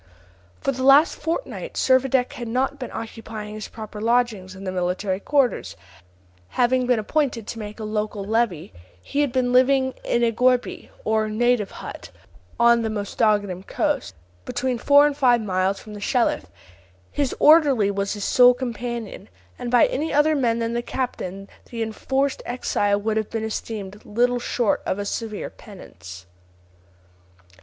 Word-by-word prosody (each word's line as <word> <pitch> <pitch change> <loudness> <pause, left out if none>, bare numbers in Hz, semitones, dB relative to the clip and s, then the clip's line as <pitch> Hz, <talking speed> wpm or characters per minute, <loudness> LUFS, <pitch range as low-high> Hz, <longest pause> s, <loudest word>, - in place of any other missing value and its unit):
For - - +1
the 260 -1 -5
last 275 +5 +6
fortnight 340 +9 -4
Servadac 260 -1 +2
had 240 - -6
not 265 +4 -1
been 250 - -5
occupying 220 -1 -7
his 215 0 -6
proper 215 -1 -9
lodgings 225 -5 0
in 190 - -10
the 190 - -3
military 185 +1 -1
quarters; 275 +2 0 0.7
having 250 - +1
been 250 -1 +3
appointed 240 0 -1
to 225 - -6
make 210 +1 -7
a - - -5
local 210 -1 -3
levy, 215 - -1 0.3
he 280 - -2
had 285 -4 +1
been 250 0 0
living 260 +1 +4
in 240 - +1
a 230 - +3
gourbi, 250 +2 +1 0.2
or 220 0 +1
native 235 -1 +1
hut, - - -9 0.5
on 235 0 +5
the 225 - -1
Mostaganem 205 -2 0
coast, - - -2 0.3
between 250 - -2
four 285 +3 +6
and 295 -1 +1
five 245 -3 +4
miles 190 -2 0
from 215 - -11
the 205 - -8
Shelif. 235 - +1 0.7
His 280 -3 -1
orderly 285 -10 +5
was 200 0 -2
his 205 -1 -5
sole 250 +2 +6
companion, 235 -4 -5 0.3
and 245 -1 -4
by 245 0 +5
any 305 +4 -2
other 295 +2 +3
man 235 -5 +1
than 230 0 -2
the 240 - -1
captain 195 -7 -4 0.2
the 230 -1 -3
enforced 265 +5 -1
exile 205 -4 0
would 215 +1 -1
have 215 -1 -1
been 225 -1 -3
esteemed 210 -2 -5
little 245 +3 +1
short 240 -2 0
of - - -2
a 205 - -3
severe 215 0 -4
penance. 90 - -12
230 Hz, 160 wpm, -23 LUFS, 210-255 Hz, 0.7 s, last